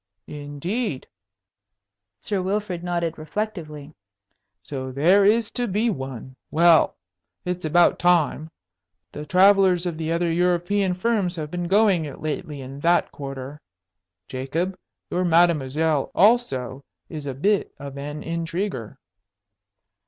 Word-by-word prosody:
"Indeed!" 150 Hz, -, -4 dB, 1.2 s
Sir 200 Hz, -3 st, -1 dB
Wilfrid 190 Hz, -2 st, -2 dB
nodded 170 Hz, -2 st, -2 dB
reflectively. 155 Hz, -4 st, -5 dB, 0.7 s
"So 130 Hz, -2 st, -5 dB
there 175 Hz, +9 st, +4 dB
is 220 Hz, +1 st, +3 dB
to 245 Hz, -1 st, -2 dB
be 215 Hz, +4 st, +1 dB
one! 130 Hz, -, -7 dB
Well, 170 Hz, 0 st, +4 dB, 0.5 s
it's 180 Hz, -1 st, -3 dB
about 170 Hz, +3 st, +4 dB
time. 165 Hz, -3 st, +2 dB, 0.6 s
The 150 Hz, 0 st, -8 dB
travellers 185 Hz, -1 st, +5 dB
of 170 Hz, -2 st, -3 dB
the 160 Hz, 0 st, -2 dB
other 170 Hz, 0 st, +1 dB
European 180 Hz, +2 st, +1 dB
firms 195 Hz, -2 st, 0 dB
have 155 Hz, -2 st, -5 dB
been 175 Hz, -1 st, -3 dB
going 195 Hz, -4 st, +3 dB
it 145 Hz, -, -8 dB
lately 150 Hz, -1 st, -4 dB
in 135 Hz, +2 st, -8 dB
that 170 Hz, +3 st, +2 dB
quarter. 135 Hz, +1 st, -7 dB, 0.7 s
Jacob, 160 Hz, +9 st, -3 dB, 0.4 s
your 180 Hz, -, 0 dB
mademoiselle 160 Hz, -4 st, +2 dB
also 140 Hz, -, +2 dB, 0.2 s
is 150 Hz, -3 st, -7 dB
a 135 Hz, -, -4 dB
bit 200 Hz, +9 st, +1 dB
of 140 Hz, -1 st, -8 dB
an 145 Hz, +2 st, -6 dB
intriguer!" 165 Hz, -, -4 dB
170 Hz, 120 wpm, -23 LUFS, 145-185 Hz, 1.2 s, travellers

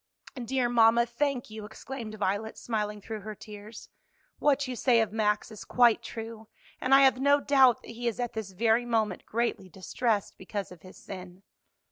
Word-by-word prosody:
"Dear 255 Hz, +1 st, 0 dB
mamma, 235 Hz, 0 st, +5 dB
thank 245 Hz, 0 st, -2 dB
you!" 215 Hz, 0 st, -7 dB
exclaimed 220 Hz, +1 st, -7 dB
Violet, 205 Hz, +2 st, -2 dB
smiling 210 Hz, -2 st, -3 dB
through 220 Hz, +1 st, -6 dB
her 215 Hz, +1 st, -7 dB
tears. 210 Hz, +1 st, -11 dB, 0.5 s
"What 285 Hz, -1 st, +2 dB
you 255 Hz, -, -4 dB
say 240 Hz, -1 st, +3 dB
of 220 Hz, -2 st, +1 dB
Max 210 Hz, -1 st, 0 dB
is 215 Hz, -, -9 dB
quite 240 Hz, -3 st, +4 dB
true, 225 Hz, -1 st, -8 dB, 0.3 s
and 265 Hz, +1 st, +4 dB
I 275 Hz, -, +7 dB
have 265 Hz, -2 st, +5 dB
no 285 Hz, +2 st, +4 dB
doubt 265 Hz, -4 st, +4 dB
that -, -, -10 dB
he 240 Hz, +1 st, -4 dB
is 235 Hz, +1 st, -2 dB
at 245 Hz, -1 st, -2 dB
this 220 Hz, -3 st, -5 dB
very 225 Hz, +4 st, +2 dB
moment 220 Hz, -5 st, -1 dB
greatly 230 Hz, -4 st, -2 dB
distressed 205 Hz, +3 st, -2 dB
because 195 Hz, +1 st, -5 dB
of 180 Hz, -3 st, -13 dB
his 185 Hz, -, -14 dB
sin." 185 Hz, 0 st, -10 dB
225 Hz, 180 wpm, -28 LUFS, 210-245 Hz, 0.5 s, I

